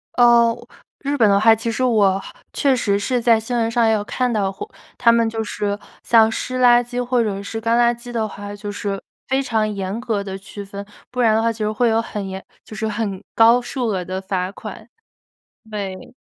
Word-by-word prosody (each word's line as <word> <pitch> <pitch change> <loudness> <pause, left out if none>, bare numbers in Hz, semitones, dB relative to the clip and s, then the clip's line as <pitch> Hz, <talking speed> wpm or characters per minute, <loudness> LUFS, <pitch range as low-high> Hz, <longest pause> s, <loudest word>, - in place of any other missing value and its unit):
哦， 235 -1 +5 0.4
日 285 0 -2
本 220 -4 +5
的 200 - +4
话， 225 +2 +6
其 230 +1 -3
实 255 - -2
我 200 -6 +3 0.3
确 275 -3 +2
实 200 -5 +1
是 245 +4 -1
在 230 -1 +4
新 235 +3 -4
闻 225 -1 +1
上 230 -1 +2
也 220 - +4
有 205 -1 0
看 250 +3 -1
到 200 -3 0
过， 415 - -8 0.3
他 235 -1 +5
们 230 -1 +3
就 225 0 -3
是 205 -1 -2 0.3
像 225 -1 +5
湿 255 +2 -3
垃 245 0 +6
圾 245 +1 -3
或 245 0 +1
者 200 -2 -3
是 225 - -5
干 230 +1 +2
垃 240 0 +4
圾 240 0 -10
的 225 -2 -1
话， 205 0 -8
就 205 0 -6
是 200 -1 -4 0.3
非 265 +1 +1
常 220 -4 0
严 200 +2 -4
格 220 -5 -2
地 190 -1 -6
区 200 +1 -9
分， 200 0 -8 0.3
不 250 - -6
然 220 -2 +4
的 225 - +2
话 230 - +2
其 225 - -10
实 215 0 0
会 235 +2 +2
有 225 0 +2
很 210 -3 -5
严 190 0 -6 0.2
就 215 - -11
是 220 0 -2
很 210 -3 -3
高 230 +2 +6
数 245 -1 -3
额 185 -4 -1
的 185 0 -4
罚 190 -1 -2
款， 215 +2 -9 0.8
对。 195 -3 -6
220 Hz, 240 characters per minute, -20 LUFS, 205-240 Hz, 0.8 s, 话